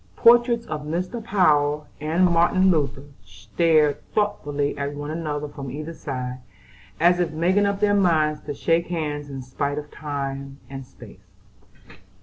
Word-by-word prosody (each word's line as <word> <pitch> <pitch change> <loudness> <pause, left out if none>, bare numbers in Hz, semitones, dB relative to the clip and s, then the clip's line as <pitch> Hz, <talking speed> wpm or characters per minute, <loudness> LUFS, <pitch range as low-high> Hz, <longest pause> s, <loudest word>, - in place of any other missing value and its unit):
Portraits 235 - +5
of 150 - -4
Mr. 180 +9 -3
Power 150 -8 +2
and 160 +5 +2
Martin 180 +2 +4
Luther 140 -4 -1 0.2
stared 145 - +1
thoughtfully 145 -9 0
at 140 0 -4
one 145 +1 -5
another 150 -2 -3
from 140 -2 -8
either 155 +5 -6
side, 130 -4 -5 0.6
as 175 +2 +4
if 175 -2 +1
making 180 +6 +2
up 200 0 -2
their 205 -1 +3
minds 155 -6 +2
to 145 - -3
shake 165 +3 +1
hands 150 -4 -3
in 135 -2 -6
spite 140 +3 -3
of 150 0 -6
time 140 -2 -5
and 135 -2 -7
space. 95 -6 -16
150 Hz, 145 wpm, -23 LUFS, 140-175 Hz, 0.6 s, Portraits